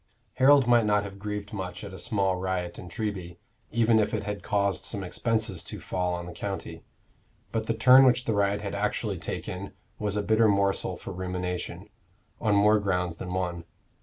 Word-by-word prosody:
Harold 140 0 +6
might 120 -1 +5
not 105 -1 +3
have 100 -1 -8
grieved 105 0 -5
much 95 -2 -5
at 100 -2 -8
a 95 - -8
small 100 -5 0
riot 90 -1 -3
in 90 - -9
Treby, 90 -3 -4 0.3
even 115 0 +3
if 105 - +1
it - - -3
had 105 -1 -4
caused 100 -4 0
some 100 -3 -3
expenses 110 -1 -1
to - - -6
fall 90 -1 -2
on 85 0 -5
the 90 - -7
county; - - -5 0.7
but 110 - -2
the 115 - 0
turn 130 +4 +8
which 125 -1 +4
the 110 - 0
riot 100 0 +1
had 100 -1 -4
actually - - -1
taken 95 +2 -5 0.3
was 105 -1 -1
a 105 - 0
bitter 110 +1 +4
morsel 100 -2 +1
for - - -7
rumination, 90 0 -4 0.5
on 105 -2 +2
more 105 +1 +5
grounds 90 -4 -1
than 90 0 -5
one. 90 -2 -2
100 Hz, 190 wpm, -27 LUFS, 90-110 Hz, 0.7 s, turn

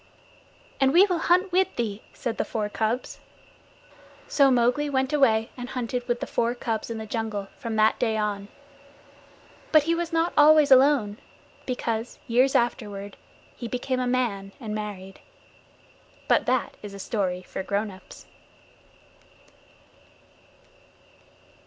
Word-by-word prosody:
"And 270 0 +3
we 370 +3 +7
will 360 -4 -1
hunt 365 +2 +3
with 375 +2 +1
thee," 220 -3 -3
said 235 -3 -5
the - - +2
four 210 -2 -3
cubs. 220 +4 -2 1.1
So 280 -2 +4
Mowgli 250 +4 +2
went 265 +1 0
away 230 -6 +3
and 245 0 -7
hunted 250 -1 -3
with 240 -1 -1
the - - -1
four 235 +1 -1
cubs 225 -3 -3
in 230 - -4
the 220 - -6
jungle 215 -3 -4
from 230 -2 -5
that 215 0 +3
day 225 -3 +1
on. 205 -2 -2 1.2
But 310 -2 +6
he 330 +2 +1
was 340 0 -2
not 330 +1 +1
always 300 -1 +6
alone, 260 -6 +4 0.5
because, 235 -2 -3
years 255 +3 +2
afterward, 205 -4 -1 0.4
he 235 - -6
became 255 +2 -2
a 250 - -1
man 215 -6 -1
and 220 -5 -5
married. 200 -3 -6 1.1
But - - +2
that 255 0 0
is 205 -1 -8
a - - -9
story 185 -3 -2
for - - -6
grown 200 +2 -2
ups. 185 0 -14
235 Hz, 140 wpm, -25 LUFS, 210-265 Hz, 1.2 s, we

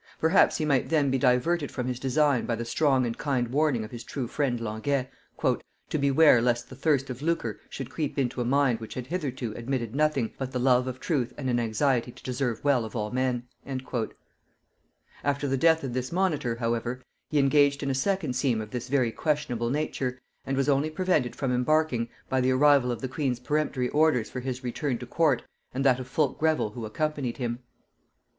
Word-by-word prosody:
Perhaps 160 +5 +4
he 155 - -1
might 140 -4 +1
then 145 -4 +2
be 135 - +1
diverted 140 +6 +2
from 125 - -4
his 125 -1 -3
design 135 0 +2
by 115 - 0
the 115 +1 -4
strong 135 0 +2
and 115 -1 -2
kind 130 -5 0
warning 140 -3 +1
of 110 - -8
his 120 -2 -7
true 130 0 -4
friend 125 -2 -1
Languet, 115 +5 -1 0.4
"to - - -2
beware 140 -2 +5
lest 120 0 0
the - - -8
thirst 140 -1 +1
of 125 +1 -7
lucre 150 -9 -1
should 135 -1 -6
creep 150 -3 -3
into 125 -2 0
a - - +1
mind 130 -1 +2
which 110 - -8
had 125 - -4
hitherto 130 -8 -3
admitted 120 -2 -3
nothing 140 -5 +1
but 130 0 -4
the - - 0
love 125 0 +3
of 130 0 -5
truth 130 -6 -1
and 130 -3 -2
an 120 - +2
anxiety 120 +2 +1
to - - -17
deserve 125 -3 -2
well 140 -5 +3
of 110 - -8
all 105 -2 -2
men." 125 -1 0 1.8
After 140 0 0
the 135 - +1
death 160 +3 +4
of 130 -3 -3
this 130 0 -3
monitor, 165 -10 0
however, 120 +2 -2 0.3
he 150 - 0
engaged 140 0 +4
in 140 - 0
a - - 0
second 160 0 0
scheme 125 -3 +1
of 105 -1 -6
this 125 -1 -4
very 130 -4 +2
questionable 125 -5 -1
nature, 130 -3 -2 0.3
and 135 0 -1
was 135 - +1
only 145 +2 +2
prevented 155 -7 0
from 135 -3 -1
embarking 125 -2 +1 0.2
by 130 0 +1
the 130 - +2
arrival 135 -1 +4
of 115 -2 -4
the 130 - -2
queen's 130 -3 -2
peremptory 135 -2 0
orders 150 -6 +2
for 130 - -4
his 130 0 -4
return 125 +1 -2
to 125 - -8
court 145 -1 +2 0.3
and 135 +1 -1
that 130 -2 +4
of 130 - -6
Fulke 135 0 0
Greville 155 -9 +1
who 110 0 -6
accompanied 145 +1 -2
him. 120 -2 -3
130 Hz, 205 wpm, -27 LUFS, 120-145 Hz, 1.8 s, beware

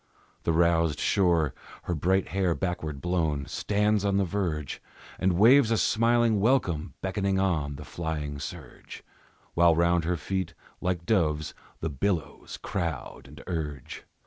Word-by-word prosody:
The - - +2
roused 85 -2 +2
shore, 85 -8 +2 0.3
her 90 - -2
bright 95 +4 +1
hair 95 -3 +1
backward 80 -6 -3
blown, 80 -6 0
Stands 105 +3 0
on 100 -1 +1
the 100 - +2
verge 85 -7 -3 0.4
And 95 -1 +2
waves 120 +4 +6
a 115 - +2
smiling 115 -1 +3
welcome, 100 - +1
beckoning 95 0 0
on 80 -7 0
The - - -9
flying 75 -4 -4
surge, - - -9 0.5
While 85 -1 +5
round 85 0 +2
her 90 +1 0
feet, 90 +1 -3 0.3
like 90 -2 -1
doves, 75 -8 +1 0.3
the 80 - -1
billows 80 +3 -3
crowd 80 -7 -4
and 75 +2 -12
urge. 75 -7 -5
85 Hz, 140 wpm, -27 LUFS, 80-95 Hz, 0.5 s, waves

